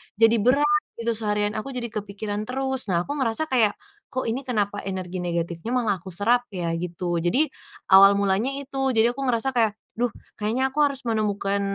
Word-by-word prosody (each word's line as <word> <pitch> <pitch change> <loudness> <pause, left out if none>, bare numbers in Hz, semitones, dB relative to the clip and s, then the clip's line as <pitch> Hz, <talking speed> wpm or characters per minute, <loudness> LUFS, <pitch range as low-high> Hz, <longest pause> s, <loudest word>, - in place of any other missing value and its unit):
jadi 225 +2 +5
berat 295 +6 +3 0.2
gitu 230 0 0
seharian, 210 -1 0
aku 275 - -6
jadi 240 -1 -2
kepikiran 205 0 -4
terus. 265 0 -2
Nah 170 0 +2
aku - - -4
ngerasa 260 +5 0
kayak, 225 -5 +4 0.4
"Kok 260 - -2
ini 245 +5 -2
kenapa 205 -5 -1
energi 185 -2 -4
negatifnya 170 +4 -3
malah 220 -5 +1
aku 185 +2 -9
serap 230 +7 +2
ya?" 170 -3 -2
gitu. 175 0 -3
Jadi, 265 - +3 0.4
awal 195 +1 +8
mulanya 200 +6 +1
itu, 270 -1 -1
jadi 235 +1 +3
aku 275 - -5
ngerasa 255 +3 0
kayak, 225 -3 +3 0.2
"Duh 240 +1 0 0.2
kayaknya 220 +5 -1
aku - - 0
harus 280 -2 +1
menemukan, 205 -2 0
220 Hz, 180 wpm, -24 LUFS, 195-250 Hz, 0.4 s, awal